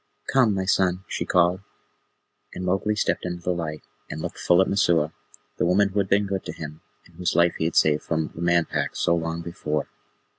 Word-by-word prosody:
"Come, 125 -6 +4
my 95 -1 -1
son," 95 -1 +1
she - - -3
called, 90 +1 +3 1.0
and 90 - -4
Mowgli 95 +3 +1
stepped 110 - 0
into 90 -1 -5
the 90 - 0
light, 80 -3 -5 0.3
and 75 - -5
looked - - -5
full 90 - +4
at 95 - +4
Messua, 85 -6 +2 0.5
the - - +2
woman 100 +3 +3
who 100 +1 -1
had 95 -1 0
been 100 +1 +3
good 95 -1 -3
to - - -5
him, 75 0 -8 0.2
and - - -21
whose 90 - -1
life 85 0 +4
he 80 - 0
had 80 - -2
saved 75 -1 +4
from 80 -1 -2
the 80 - -8
Man 85 -1 +3
Pack - - -2
so - - +2
long 85 0 -3
before. 75 -3 -3
85 Hz, 215 wpm, -24 LUFS, 80-95 Hz, 1.0 s, Come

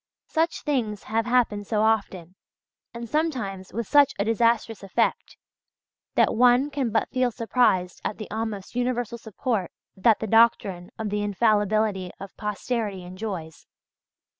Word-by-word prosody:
Such 325 +1 0
things 230 -9 -1
have 225 +2 -1
happened 230 -5 +1
so 215 -1 +1
often, 195 -6 0 0.6
and 235 0 -7
sometimes 235 - -2
with 230 +2 -3
such 285 -1 +5
a 200 - 0
disastrous 230 0 +1
effect, 195 -2 -1 0.8
that - - +4
one 250 +4 +4
can 275 -4 -1
but 220 0 0
feel 255 -1 +2
surprised 225 -6 +1
at - - -3
the 215 - -6
almost 215 -3 -4
universal 245 -2 -1
support 220 -3 -2 0.3
that 215 +3 +4
the - - -4
doctrine 205 -5 +3
of 220 -2 -3
the 210 0 -1
infallibility 205 -2 +1
of 195 0 -9
posterity 210 -2 -3
enjoys. 180 -5 -7
220 Hz, 140 wpm, -25 LUFS, 200-240 Hz, 0.8 s, such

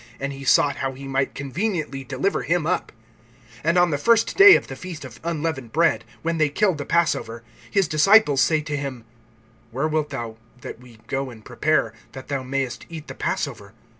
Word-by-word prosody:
And 140 0 -3
he 135 0 -9
sought 140 +1 +3
how 135 0 -2
he 135 +1 -9
might 135 0 -1
conveniently 150 - -3
deliver 135 +9 -1
him 170 -2 0
up. 180 - -1 0.7
(12)And 165 +3 +3
on 175 -1 +3
the 145 - -1
first 230 +5 +3
day 400 0 +10
of - - 0
the 135 - -8
feast 175 +1 -8
of - - -11
unleavened 155 -7 -3
bread, 165 +2 +2 0.2
when 165 0 -1
they 155 -1 +3
killed 185 +1 +1
the 145 - -5
passover, 120 -9 0 0.3
his 195 -4 +2
disciples 155 -1 +5
say 160 -2 +3
to 150 -1 -4
him: 135 -5 -5 0.6
Where 135 +6 -1
wilt 155 -1 -1
thou 120 -5 -6 0.2
that - - -8
we 125 -2 -16
go 135 +3 -3
and 110 -3 -13
prepare, 125 -2 0 0.2
that 130 -1 -10
thou 140 -2 -1
mayest 130 -1 -3
eat 160 -2 -9
the - - -5
passover? 110 -7 -4
145 Hz, 195 wpm, -23 LUFS, 130-165 Hz, 0.7 s, day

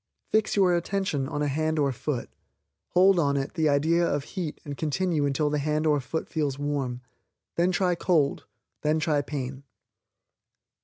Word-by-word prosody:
Fix 220 0 +2
your 185 -3 +4
attention 170 -6 -1
on 150 -1 -2
a - - +1
hand 155 +3 0
or 140 -2 +2
foot, 130 0 -4 0.6
hold 185 0 +5
on 140 -3 +2
it 135 0 -3
the 155 -1 +2
idea 160 +4 +3
of 145 -4 0
heat 170 -1 -5
and 145 -1 -5
continue 155 0 0
until 145 +2 0
the 150 - +1
hand 150 +2 0
or 150 -2 +3
foot 140 +5 -4
feels 145 -4 -1
warm. 140 -4 -2 0.5
Then 175 +2 +2
try 180 -1 +2
cold; 165 -4 +1 0.3
then 155 +1 +2
try 150 -2 +1
pain. 135 -2 -5
150 Hz, 165 wpm, -27 LUFS, 140-170 Hz, 0.6 s, hold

